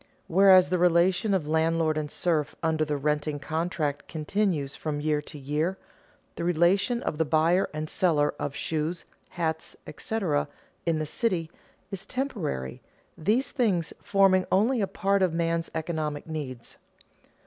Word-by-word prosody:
Whereas 190 0 +6
the 180 - +2
relation 180 +4 +3
of 160 -6 -1
landlord 160 0 +2
and 155 -1 -2
serf 155 -2 0
under 160 -1 +2
the 150 -1 -1
renting 150 +1 -1
contract 155 -1 -2
continues 160 -3 -1
from 150 -2 -3
year 150 0 0
to 150 +1 -10
year, 150 +7 -1 0.6
the - - -3
relation 175 +8 +2
of 150 - -3
the - - +4
buyer 160 +4 +2
and 155 0 -4
seller 155 -4 +2
of 140 -1 -3
shoes, 160 +2 -2 0.2
hats, 160 -2 -2
etc., 185 -10 -1 0.4
in 165 -1 +2
the 155 - -1
city, 170 -1 -1 0.4
is 195 +1 -5
temporary, 175 - -3 0.3
these 215 - +1
things 200 - 0
forming 195 -2 +3
only 225 +5 +3
a 195 - +1
part 195 +1 +1
of 185 -3 +2
man's 165 0 0
economic 155 -2 -3
needs. 140 -7 -6
165 Hz, 145 wpm, -27 LUFS, 150-185 Hz, 0.6 s, Whereas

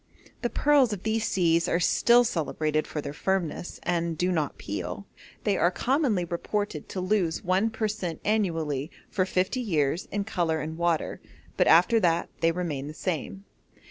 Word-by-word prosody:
The 240 - 0
pearls 280 -6 +3
of 195 - -6
these 220 0 0
seas 170 -2 +2
are 170 - +1
still 240 +7 +5
celebrated 155 -7 -1
for 150 - -4
their 140 - -6
firmness, 180 0 -2
and 170 -2 -1
do 180 +2 +1
not 155 -5 -1
peel. 100 - -5 0.4
They 200 -3 +1
are 175 - +4
commonly 245 - +1
reported 170 -1 -3
to 190 - -4
lose 185 -3 0
one 190 +5 +2
per 220 -1 -1
cent. 185 -6 -4
annually 165 -9 0 0.2
for 185 -1 +1
fifty 185 +8 0
years 160 - 0
in 205 0 -1
colour 175 -6 -1
and 160 +1 -4
water, 170 -1 -1 0.3
but - - +3
after 180 +8 +6
that 170 -4 +1
they 165 0 +3
remain 160 -6 -3
the 155 - -8
same. 185 +3 -4
180 Hz, 170 wpm, -27 LUFS, 160-210 Hz, 0.4 s, after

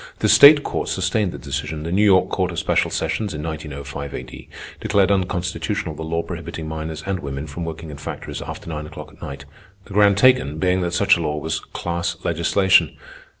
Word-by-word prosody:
The - - +1
state 145 +1 +9
court - - -3
sustained 95 +1 0
the - - -7
decision. 75 +2 -4
The 85 - -4
New 100 +4 +3
York 95 -3 +5
Court 95 -2 0
of 85 - -6
Special - - +1
Sessions, 85 +4 -2
in 75 - -5
1905 70 -3 -6
A.D., - - -9 0.3
declared 100 -1 +2
unconstitutional 95 0 -1
the 75 - -9
law 85 +1 -2
prohibiting 80 - -6
minors 80 0 -5
and 95 -1 -2
women 70 -1 -5
from 80 +3 -6
working 80 -1 -7
in 70 - -8
factories 75 - -6
after - - -8
nine 75 -2 -5
o'clock 80 - -10
at - - -21
night, 70 0 -7 0.4
the - - -11
ground 100 0 +5
taken 125 - +4
being 90 +2 +1
that 85 -1 -1
such 100 +1 +4
a - - -3
law 75 -2 -1
was 80 +1 -2
"class 85 0 -3
legislation." 85 +3 +3
85 Hz, 195 wpm, -21 LUFS, 75-95 Hz, 0.4 s, state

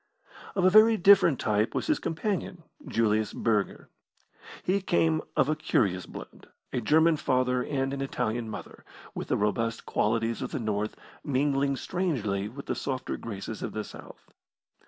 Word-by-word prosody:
Of 185 - +2
a 185 - +6
very 220 +2 +7
different 190 - +6
type 105 +1 0
was - - -1
his 310 - +1
companion, 180 0 -3 0.2
Julius 110 -2 +1
Burger. 105 -4 -1 0.8
He 195 +2 +1
came 165 -4 +2 0.2
of 135 - +4
a 155 - +1
curious 95 -11 0
blend, - - -11 0.3
a 125 - 0
German 160 +6 +4
father 125 -2 +1
and 135 0 -1
an 140 - -3
Italian 120 -4 -2
mother, 105 - -9 0.3
with - - -5
the - - +1
robust 115 +2 -1
qualities 115 +1 0
of - - -3
the - - -2
North 105 -2 -2 0.3
mingling 140 0 +1
strangely 120 - -2
with 140 +5 -9
the - - -1
softer 130 -2 -3
graces 105 0 -6
of - - -4
the 110 - -3
South. - - -12
130 Hz, 155 wpm, -28 LUFS, 110-160 Hz, 0.8 s, very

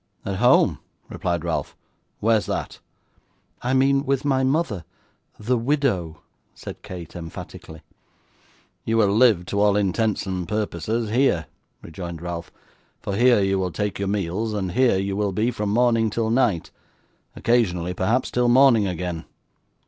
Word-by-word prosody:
'At 100 -1 -2
home!' - - +4 0.3
replied 85 -2 -2
Ralph; 85 - -3 0.4
'where's 110 0 +2
that?' - - -4 0.8
'I 125 +2 -1
mean 135 +1 +3
with 140 -1 -1
my 135 -2 +2
mother 130 - 0 0.5
THE 120 +3 0
WIDOW,' 115 - 0 0.4
said - - -9
Kate 90 -3 -9
emphatically. 80 -1 -9 1.0
'You 115 0 0
will 100 -2 +3
live, 110 -7 +4
to 100 - -2
all 105 -1 +4
intents 105 +1 0
and 90 -2 -3
purposes, 105 +2 -2
here,' 115 - +2 0.4
rejoined 85 0 -7
Ralph; 85 0 -6 0.5
'for 100 - -4
here 120 0 +4
you 95 0 +1
will 90 -1 -1
take 105 +2 -3
your 100 - -1
meals, 100 +2 -2
and 95 -3 -2
here 120 0 +3
you 95 0 -2
will 100 -1 -1
be 110 +6 +1
from 105 -3 -3
morning 115 0 +3
till 110 +1 -1
night 115 -9 +1 0.6
occasionally 90 -7 +1
perhaps 110 +8 0
till 125 0 +2
morning 120 -5 +5
again. 90 -2 -4
105 Hz, 145 wpm, -23 LUFS, 90-120 Hz, 1.0 s, morning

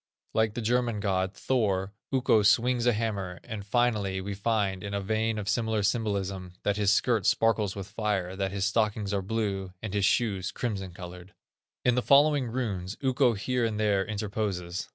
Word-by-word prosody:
Like 110 -1 +1
the 120 - -3
German 120 -1 +1
god, 95 -1 0
Thor, 100 -6 0 0.2
Ukko 125 -5 +3
swings 120 +4 +3
a 120 - +5
hammer; 100 -5 -3
and, 110 -2 -6
finally, 105 -3 +1
we 100 +2 -4
find, 100 -2 0
in 100 0 -4
a - - 0
vein 110 +2 0
of 105 -2 -4
familiar 110 0 0
symbolism, 100 -4 -1
that 100 - +1
his 105 -1 +2
skirt 115 0 +2
sparkles 110 -3 +2
with 100 -2 -5
fire, 100 -3 -2
that 95 -1 -2
his 100 -1 -1
stockings 105 -1 0
are 100 - +1
blue, 100 -2 -2
and 105 -1 -6
his 100 -1 +1
shoes, 100 -3 +1
crimson 100 -6 -3
colored. 90 +1 -10 0.5
In 125 - +5
the 125 - +1
following 140 0 +4
runes, 105 -6 -3
Ukko 130 -2 +3
here 125 +4 -1
and 110 -2 -1
there 100 -2 +2
interposes. 100 -4 -3
105 Hz, 175 wpm, -28 LUFS, 95-115 Hz, 0.5 s, a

